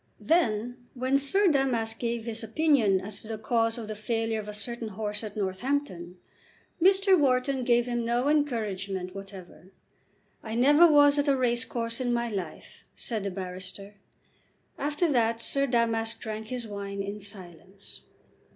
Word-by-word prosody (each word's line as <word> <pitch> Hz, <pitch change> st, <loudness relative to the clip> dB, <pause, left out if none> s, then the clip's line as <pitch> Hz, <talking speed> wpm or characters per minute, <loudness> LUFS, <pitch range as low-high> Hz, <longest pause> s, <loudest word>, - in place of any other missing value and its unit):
Then 245 Hz, -5 st, 0 dB
when 260 Hz, +2 st, +1 dB
Sir 385 Hz, +9 st, +2 dB
Damask 245 Hz, -7 st, +1 dB
gave 235 Hz, -1 st, -2 dB
his 230 Hz, 0 st, -3 dB
opinion 225 Hz, -5 st, +3 dB
as 200 Hz, +1 st, -8 dB
to -, -, -13 dB
the 220 Hz, 0 st, -4 dB
cause 225 Hz, +1 st, +1 dB
of 225 Hz, -3 st, -6 dB
the 215 Hz, -, -4 dB
failure 225 Hz, +1 st, -2 dB
of 210 Hz, -, -7 dB
a -, -, -4 dB
certain 230 Hz, +3 st, -3 dB
horse 210 Hz, +1 st, -3 dB
at 215 Hz, -1 st, -7 dB
Northampton, 190 Hz, -3 st, -2 dB, 0.6 s
Mr. 385 Hz, +1 st, +5 dB
Wharton 265 Hz, -3 st, +1 dB
gave 240 Hz, -1 st, +3 dB
him 240 Hz, -1 st, -2 dB
no 240 Hz, +3 st, 0 dB
encouragement 205 Hz, -11 st, -1 dB
whatever. 190 Hz, -2 st, -11 dB, 0.7 s
"I 220 Hz, 0 st, -5 dB
never 295 Hz, +7 st, +6 dB
was 290 Hz, -1 st, +6 dB
at 285 Hz, -, +1 dB
a 275 Hz, -1 st, +3 dB
racecourse 240 Hz, -1 st, -1 dB
in 245 Hz, -1 st, 0 dB
my 235 Hz, 0 st, 0 dB
life," 190 Hz, -7 st, -7 dB
said 220 Hz, -4 st, -4 dB
the -, -, 0 dB
barrister. 185 Hz, +2 st, -6 dB, 0.8 s
After 295 Hz, +4 st, 0 dB
that 230 Hz, -2 st, +1 dB
Sir 275 Hz, 0 st, 0 dB
Damask 230 Hz, -2 st, 0 dB
drank 220 Hz, -1 st, -6 dB
his 245 Hz, -1 st, -5 dB
wine 200 Hz, -1 st, -5 dB
in 200 Hz, +1 st, -5 dB
silence. 190 Hz, -1 st, -9 dB
230 Hz, 155 wpm, -28 LUFS, 205-255 Hz, 0.8 s, never